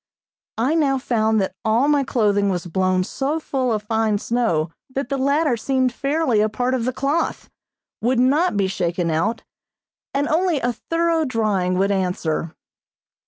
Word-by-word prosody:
I 250 +7 +1
now 285 -4 +2
found 220 -4 +1
that 190 - -2
all 225 +5 +2
my 290 -2 +3
clothing 205 -6 +1
was 180 -2 -2
blown 185 +1 +1
so 280 +10 -2
full 260 -5 -1
of 215 -2 -1
fine 220 -1 +1
snow 200 -9 0 0.2
that 270 -2 -2
the 275 - -1
latter 280 0 +2
seemed 260 +1 0
fairly 275 -5 +1
a 215 - +2
part 245 +4 -1
of 245 -3 -1
the 255 - 0
cloth, 280 +6 -2 0.5
would 245 +2 +1
not 280 - +2
be 200 - +2
shaken 175 -2 -1
out, 205 +9 -1 0.7
and 285 +1 0
only 330 -1 +1
a 245 -1 -1
thorough 330 +5 0
drying 210 -8 0
would 195 +2 +2
answer. 180 -4 -1
235 Hz, 165 wpm, -21 LUFS, 200-275 Hz, 0.7 s, my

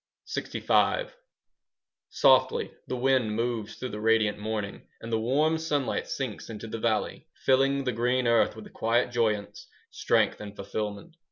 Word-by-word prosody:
LXV - - +1 1.0
Softly 465 0 +3 0.2
the - - -2
wind 125 -4 +2
moves 115 -2 -2
through 130 - -5
the 105 - -6
radiant 110 -2 +2
morning, 105 -1 -4
And 115 0 -6
the 110 - +2
warm 150 +8 +2
sunlight 145 -5 -1
sinks - - -4
into 110 -1 -7
the 115 0 -5
valley, 110 -1 -1 0.2
Filling 135 +1 +3
the 125 - 0
green 125 +2 +1
earth 115 -2 +3
with 110 - -10
a - - -13
quiet 120 +2 +1
joyance, 110 -4 -1 0.2
Strength, - - +1
and 105 -1 -8
fulfilment. 105 - -5
115 Hz, 150 wpm, -28 LUFS, 110-130 Hz, 1.0 s, Softly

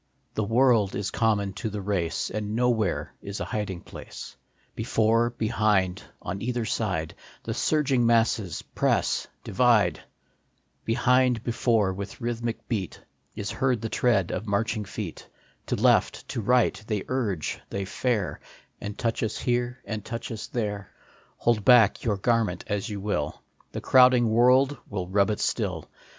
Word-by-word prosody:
The 110 - -1
world 115 -2 +3
is 100 -1 -2
common 105 -4 +1
to 110 +3 -4
the 105 0 -5
race, 95 -4 -1
And 105 0 -3
nowhere 115 -5 0
is 100 0 -6
a - - -2
hiding 100 -4 -3
place; - - -10 0.4
Before, 115 +2 +2
behind, 105 -5 +1 0.2
on 95 +2 -4
either 120 -1 -1
side, 95 -8 -2 0.3
The - - -3
surging 140 -5 +2
masses 115 -5 +1
press, - - 0 0.2
divide; 115 0 +3 0.9
Behind, 125 0 +2
before, 115 -5 +1
with 100 +1 -7
rhythmic 120 -1 -3
beat, 100 -7 -3 0.4
Is 105 -1 -4
heard 130 -1 +1
the 115 - -3
tread 105 -8 +2
of 110 - -4
marching 105 +1 0
feet; 100 -3 -7 0.4
To - - 0
left, - - +2
to 115 - -3
right, 120 0 +2
they 105 -3 -1
urge, 110 -11 -2
they 100 0 -3
fare, 105 -1 -1 0.4
And 105 0 -5
touch 115 -2 -1
us 110 - -1
here, 125 0 -1
and 110 -2 -4
touch 115 +2 -5
us 110 -1 -5
there. 105 -4 -3 0.5
Hold 115 -3 +1
back 120 -2 +6
your 105 -4 0
garment 110 -4 +1
as 105 +3 -2
you 105 -1 -4
will, 100 -7 -3 0.3
The - - -5
crowding 125 -3 +5
world 130 +4 +4
will 95 -4 -3
rub 100 +2 +2
it 105 - -1
still. - - -1
110 Hz, 150 wpm, -26 LUFS, 100-120 Hz, 0.9 s, back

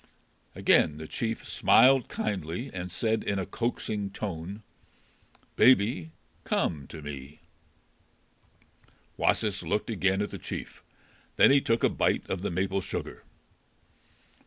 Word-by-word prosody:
Again 75 - +3
the 80 - -7
chief 115 +5 -3
smiled 130 +1 +5
kindly 95 - -3
and 90 0 -5
said 110 +3 -1
in 100 - -1
a 95 - -2
coaxing 110 -3 -3
tone, 95 +1 -6 0.9
"Baby, 100 -9 +4 0.3
come 75 -5 -1
to 80 -2 -10
me." 70 0 -8 1.7
Wasis 105 -3 +1
looked 100 +7 -2
again 95 0 +1
at 105 - -5
the - - -7
chief. - - -7 0.5
Then - - +6
he 140 0 +5
took 115 -2 0
a - - +6
bite - - 0
of 95 - -2
the 100 - -2
maple 95 +2 -1
sugar. 95 - -6
95 Hz, 125 wpm, -28 LUFS, 85-110 Hz, 1.7 s, Then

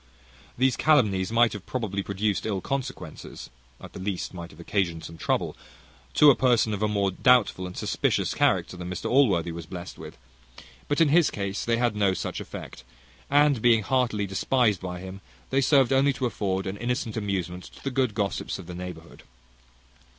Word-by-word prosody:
These 130 0 +2
calumnies 110 -11 +3
might 115 0 +4
have 105 -3 -8
probably 105 -6 -2
produced 100 +2 -1
ill 100 -3 -1
consequences, 135 +6 -6 0.3
at - - -12
the - - -8
least 95 0 -3
might 85 -1 -7
have 75 - -17
occasioned 85 -2 -1
some 85 - -8
trouble, - - -1 0.6
to 150 -1 +8
a - - +2
person 120 -4 +2
of 100 - -4
a 110 - +2
more 100 -2 0
doubtful 110 -3 +3
and 90 - -9
suspicious - - 0
character - - +1
than 90 0 -6
Mr 90 -1 -4
Allworthy 100 - +3
was 85 -1 -7
blessed 90 0 -8
with; - - -10 0.7
but 145 +3 +1
in 160 - +5
his 165 +2 +5
case 100 -1 -3
they 115 0 +1
had 120 -2 +1
no 100 -2 +2
such - - -4
effect; - - -9 0.5
and, 145 -3 +4
being 115 -2 +4
heartily 120 -3 +1
despised 105 +1 +1
by 90 -1 -5
him, 95 +1 -8 0.3
they 135 - +3
served 135 -1 +4
only 135 +1 +4
to 130 0 -3
afford 95 -5 -2
an 95 +1 -4
innocent 120 -1 -2
amusement 95 -4 -3
to - - -15
the 135 - -2
good 125 -5 0
gossips 100 -1 -2
of 95 - -10
the 90 - -8
neighbourhood. 90 -2 -9
105 Hz, 185 wpm, -26 LUFS, 95-125 Hz, 0.7 s, to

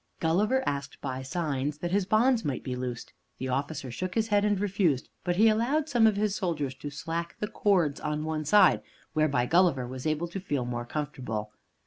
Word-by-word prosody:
Gulliver 210 +11 +2
asked, 140 0 -3
by 130 -2 -4
signs, 145 0 -2
that 175 +2 -4
his 195 -1 +1
bonds 230 +2 +3
might 140 -3 -2
be 125 - -3
loosed. 125 -1 -5 0.2
The 130 - -4
officer 135 0 -2
shook 180 +9 -4
his 225 -1 +1
head 205 -1 +3
and 205 -2 +2
refused, 190 -9 +1
but 175 -1 0
he 215 +5 +5
allowed 245 +8 +2
some 235 -2 +5
of 215 - +3
his 205 -1 0
soldiers 155 -9 -2
to 145 +2 -6
slack 165 +4 -4
the 210 - -1
cords 185 -9 +1
on 150 0 -2
one 155 -1 -2
side, 205 +8 +5 0.3
whereby 140 -5 +2
Gulliver 165 -4 +3
was 130 +3 -5
able 155 +2 0
to 195 - -5
feel 145 -9 -2
more 120 -1 -3
comfortable. 125 -7 -4
160 Hz, 195 wpm, -28 LUFS, 135-200 Hz, 0.3 s, he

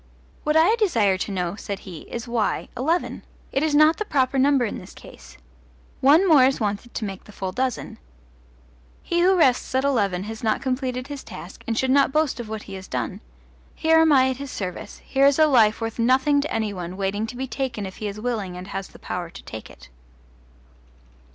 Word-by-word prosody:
What 300 +1 +2
I 345 +8 +5
desire 230 - +2
to 200 - -3
know, 180 -1 -2
said 200 -1 -6
he, 175 -5 -10
is, 235 0 -5
why 235 -3 -1
eleven? 320 +8 -1 0.3
It 270 - 0
is 310 -1 +1
not 305 +2 +6
the - - -1
proper 270 -5 +1
number 270 -2 +4
in 210 - -4
this 180 - -13
case. - - -14 0.6
One 310 +8 +5
more 300 -6 +7
is 270 +1 +1
wanted 210 +2 -3
to 220 - -2
make 195 -2 -7
the - - -13
full 190 -2 -4
dozen. 255 +4 -3 1.0
He 345 0 0
who 375 +1 +4
rests 260 -5 +2
at 260 - +2
eleven 200 -10 +1
has 220 +1 -7
not 220 -1 +1
completed 255 -1 -2
his 285 -1 -7
task 175 - -10
and 225 -1 -1
should 260 +1 +1
not 275 0 +4
boast 305 -3 +1
of 230 -3 -6
what 220 -1 -5
he 195 - -10
has 190 0 -8
done. 195 +3 -4 0.5
Here 320 0 +4
am 320 -1 +5
I 260 -2 +5
at 255 - -5
his 280 0 -7
service: 185 -6 -6
here 275 0 +3
is 280 - +3
a 315 - +6
life 225 -7 +4
worth 225 0 -4
nothing 265 +4 +3
to 300 - -4
any 220 -2 -1
one 180 0 -6
waiting 200 +3 -1
to 245 - -8
be 265 - -2
taken 260 -5 -3
if 190 - -8
he 215 - -4
is 205 +1 -6
willing 210 -6 -3
and 180 +2 -8
has 195 0 -4
the - - -16
power 175 -2 -5
to 190 - -12
take 110 - -9
it. - - -15
245 Hz, 215 wpm, -23 LUFS, 200-280 Hz, 1.0 s, more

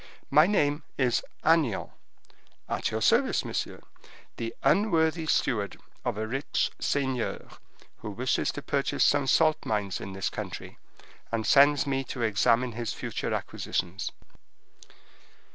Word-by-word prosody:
My 150 +4 +6
name 150 -7 +2 0.2
is 125 -3 +2 0.2
Agnan, 155 -9 +2 0.8
at - - -1
your - - -2
service, - - +3
monsieur, - - -4 0.6
the 115 0 -4
unworthy 165 -5 +2
steward 105 -9 0 0.2
of - - -2
a 110 - -2
rich 135 +6 -1
seigneur, 130 -4 -1 0.5
who 105 - -7
wishes 125 +6 0
to 145 - -6
purchase 140 -1 0
some 145 -2 +3
salt 155 +2 +3
mines 100 -4 -2
in 95 - -6
this 95 0 -2
country, - - -7 0.5
and 115 -1 -1
sends 140 0 +5
me 135 -1 -1
to 120 - -4
examine 115 +3 +2
his 115 0 -4
future - - -4
acquisitions. 90 +1 -3
130 Hz, 125 wpm, -28 LUFS, 110-145 Hz, 0.8 s, My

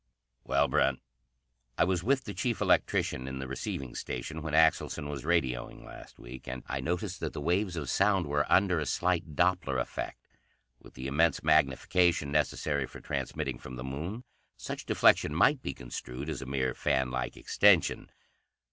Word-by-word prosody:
"Well, 70 +1 +2
Brent?" 65 0 +2 0.8
"I - - +4
was 90 0 0
with 135 +3 +2
the - - -6
chief 120 -3 -1
electrician 65 +1 +1
in 65 0 -5
the 65 0 -5
receiving 65 -1 -5
station 80 +6 -5
when 75 -1 -2
Axelson 80 -2 +3
was 70 -2 -6
radioing 65 -8 -1
last - - -12
week. 65 +2 -11
And 65 0 -5
I 70 - -3
noticed 90 +6 -3
that - - -4
the - - -5
waves 90 +4 0
of 75 -5 -4
sound 95 +2 +2
were 75 0 -1
under 95 -3 +4
a 75 - -3
slight 85 +1 0
Doppler 90 -7 +1
effect. 60 - -5 0.5
With - - -17
the 65 - -7
immense 75 +5 +2
magnification 75 +2 +3
necessary 75 -2 0
for - - -11
transmitting 65 -3 -3
from 65 - -9
the 60 - -6
Moon, 80 - -5 0.3
such - - -6
deflection - - +4
might - - +4
be - - -4
construed 60 +4 -6
as 80 - -4
a 65 - -7
mere 65 -2 0
fan 65 -2 0
like 65 -1 -3
extension. 100 -4 +3
75 Hz, 170 wpm, -30 LUFS, 65-85 Hz, 0.8 s, I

